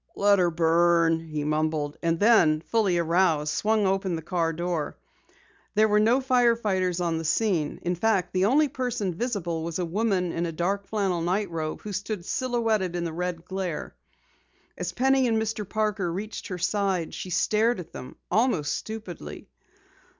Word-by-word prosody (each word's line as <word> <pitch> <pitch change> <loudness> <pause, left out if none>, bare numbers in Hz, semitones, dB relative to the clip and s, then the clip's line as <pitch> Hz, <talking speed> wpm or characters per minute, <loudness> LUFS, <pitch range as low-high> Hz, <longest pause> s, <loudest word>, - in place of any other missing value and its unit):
"Let 200 -1 +4
'er 175 -1 +3
burn," 165 0 +3
he 155 -1 -3
mumbled, 155 -1 -1
and 165 -1 0
then 175 -9 +5
fully 200 -2 +1
aroused, 165 -3 +2
swung 215 -1 +1
open 190 -2 0
the 160 - -6
car 170 -1 0
door. 170 -2 -3 0.8
There 215 +1 +5
were 210 0 +3
no 235 +5 +3
fire 250 -3 +3
fighters 185 -5 -1
on 170 -2 0
the - - -4
scene, 165 -2 0
in 175 - 0
fact 195 +1 0
the 185 0 +2
only 290 +8 +4
person 245 -8 -2
visible 175 -6 -2
was 165 -1 -3
a 180 - -1
woman 185 -1 0
in 165 -1 -3
dark 195 +4 -1
flannel 195 -5 0
night 185 +3 -1
robe, 155 -1 -4
who 210 - -6
stood 200 -1 -4
silhouetted 225 -8 0
in 175 - -2
the 165 -2 -3
red 175 0 -4
glare. 185 -4 -4 0.8
As - - -4
Penny 265 0 +2
and 225 -1 +2
Mr. 220 -2 -3
Parker 210 -5 -1
reached 205 +5 -5
her 180 - -4
side, 190 -2 -1
she 185 - -6
stared 215 +5 +2
at 170 -2 -9
them 125 - -9 0.2
almost 200 - +1
stupidly. 180 - -7
185 Hz, 170 wpm, -26 LUFS, 165-215 Hz, 0.8 s, then